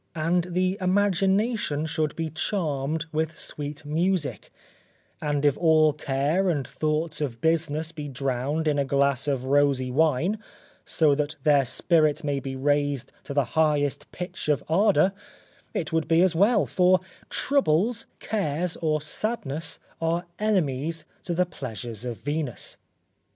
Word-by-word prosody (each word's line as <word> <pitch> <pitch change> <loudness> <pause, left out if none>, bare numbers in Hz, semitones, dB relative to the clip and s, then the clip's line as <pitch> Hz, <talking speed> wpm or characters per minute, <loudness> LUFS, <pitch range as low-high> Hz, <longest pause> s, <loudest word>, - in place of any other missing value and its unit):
And 170 +2 +1
the 185 +2 0
imagination 195 -2 +1
should 155 -1 -1
be 165 -1 -3
charmed 160 -3 -1
with 155 0 -2
sweet 145 0 -5
music, 165 0 -1 0.7
and 145 -1 0
if 145 -2 +4
all 155 -2 +5
care 150 +6 0
and 145 -7 -1
thoughts 155 0 -2
of 125 -6 -3
business 160 +1 +1
be 150 -3 -6
drowned 135 +3 -1
in 145 -1 +2
a - - +3
glass 140 0 +1
of 135 -3 0
rosy 135 -2 +2
wine, 160 +8 +2 0.5
so 155 -3 +3
that 150 +2 -1
their 145 -3 +4
spirit 155 +3 +2
may 145 -2 0
be 135 0 -5
raised 145 -1 0
to - - -5
the 140 -2 +3
highest 150 -3 +1
pitch 180 -2 -5
of 150 - +2
ardour, 195 +2 +3 0.6
it 160 -2 -3
would 160 -1 +1
be 165 +2 +4
as 185 -3 +2
well, 205 +5 +4
for 185 0 +4 0.3
troubles, 230 - +1
cares 180 -5 -2
or 155 -2 0
sadness 155 - -3 0.2
are 165 +2 0
enemies 165 -6 0 0.2
to 175 - -2
the 180 +1 +3
pleasures 120 - -7
of 120 -2 -4
Venus. 145 -3 -3
155 Hz, 140 wpm, -26 LUFS, 145-175 Hz, 0.7 s, all